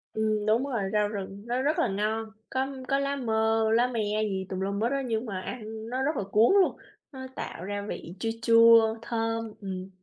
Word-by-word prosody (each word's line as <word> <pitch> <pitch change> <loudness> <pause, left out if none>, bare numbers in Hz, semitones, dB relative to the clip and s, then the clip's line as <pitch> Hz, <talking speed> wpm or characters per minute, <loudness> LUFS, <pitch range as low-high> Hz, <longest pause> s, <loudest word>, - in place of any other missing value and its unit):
Ừm, 215 -1 0
đúng 220 +4 +3
rồi. 230 -8 -2
Rau 210 -1 +3
rừng 200 -1 -6
nó 245 +2 -1
rất 300 +4 +1
là - - +3
ngon, 215 +2 -2 0.2
có 260 0 0 0.2
có 275 - +2
lá 280 0 -1
mơ 220 -3 +1
lá 240 +2 +4
me 215 -3 -1
gì 190 -3 -2
tùm 185 - -3
lum 200 +2 -2
hết 230 - +2
á 275 0 0
nhưng 230 -2 -2
mà 195 -5 -4
ăn 220 0 -7
nó 255 +2 -2
rất 300 +3 0
là - - -1
cuốn 220 - +5
luôn, 370 - +1 0.3
nó 260 -2 -8
tạo 170 - -6
ra 205 +1 -3
vị 170 - -6
chua 225 - -1
chua, 230 -1 +6
thơm, 225 -1 -2
ừm. 190 -1 -5
220 Hz, 215 wpm, -28 LUFS, 205-240 Hz, 0.3 s, chua